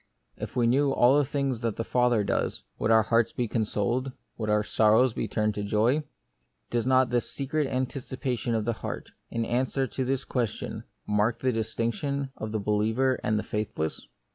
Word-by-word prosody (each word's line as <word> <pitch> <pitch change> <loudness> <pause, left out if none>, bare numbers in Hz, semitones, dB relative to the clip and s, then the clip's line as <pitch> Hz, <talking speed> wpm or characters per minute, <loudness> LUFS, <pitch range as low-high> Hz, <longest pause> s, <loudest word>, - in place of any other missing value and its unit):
If - - -7
we 120 -2 +3
knew 135 +4 +3
all 135 +3 +5
things 135 -3 -1
that 115 -3 -1
the 115 - -2
Father 125 -3 +2
does, - - -1 0.2
would - - 0
our 110 -1 +6
hearts 115 +1 +2
be 120 - -1
consoled? 115 +4 -1 0.2
would 110 -2 -3
our 105 0 +3
sorrows 110 +4 +4
be - - -2
turned 105 -1 0
into 100 0 -3
joy? 115 +8 +3 0.7
Does 120 0 0
not 130 -1 +4
the 120 -1 +3
secret 145 +3 -2
anticipation 130 -2 -2
of 110 -1 0
the 120 - +1
heart, - - -6 0.2
in 115 0 -1
answer 130 +3 0
to 130 +1 -3
this 130 +1 -1
question, 120 -5 -3 0.2
mark 105 +2 +1
the 130 - +1
distinction 115 +5 -2
of 110 -1 -5
the 110 - 0
be 105 +1 -2
liever 110 +5 +2
and 110 - +1
the 105 - -1
faithless 105 -7 -3
120 Hz, 185 wpm, -27 LUFS, 110-130 Hz, 0.7 s, our